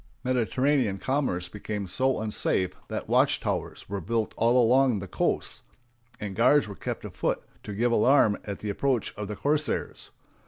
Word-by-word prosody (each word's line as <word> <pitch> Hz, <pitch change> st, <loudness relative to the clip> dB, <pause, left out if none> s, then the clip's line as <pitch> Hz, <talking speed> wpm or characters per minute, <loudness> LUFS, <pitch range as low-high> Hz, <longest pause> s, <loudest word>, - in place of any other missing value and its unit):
Mediterranean 130 Hz, -2 st, +1 dB
commerce 100 Hz, -6 st, -1 dB
became 105 Hz, +2 st, -5 dB
so 130 Hz, +9 st, 0 dB
unsafe 105 Hz, -4 st, 0 dB
that -, -, -4 dB
watch -, -, +3 dB
towers -, -, -3 dB
were 100 Hz, 0 st, -4 dB
built 110 Hz, +5 st, -1 dB
all 120 Hz, +3 st, +3 dB
along 125 Hz, 0 st, +4 dB
the 100 Hz, 0 st, -6 dB
coasts, -, -, -1 dB, 0.6 s
and 100 Hz, -2 st, -5 dB
guards 130 Hz, +6 st, +4 dB
were 100 Hz, -, -6 dB
kept -, -, -5 dB
afoot -, -, -2 dB, 0.2 s
to 105 Hz, -, -7 dB
give 120 Hz, +3 st, +1 dB
alarm 115 Hz, -2 st, +4 dB
at 100 Hz, -1 st, -5 dB
the 105 Hz, -, -4 dB
approach 130 Hz, +1 st, 0 dB
of 105 Hz, -1 st, -5 dB
the 105 Hz, -, -5 dB
corsairs. 150 Hz, +3 st, -1 dB
115 Hz, 160 wpm, -27 LUFS, 100-130 Hz, 0.6 s, along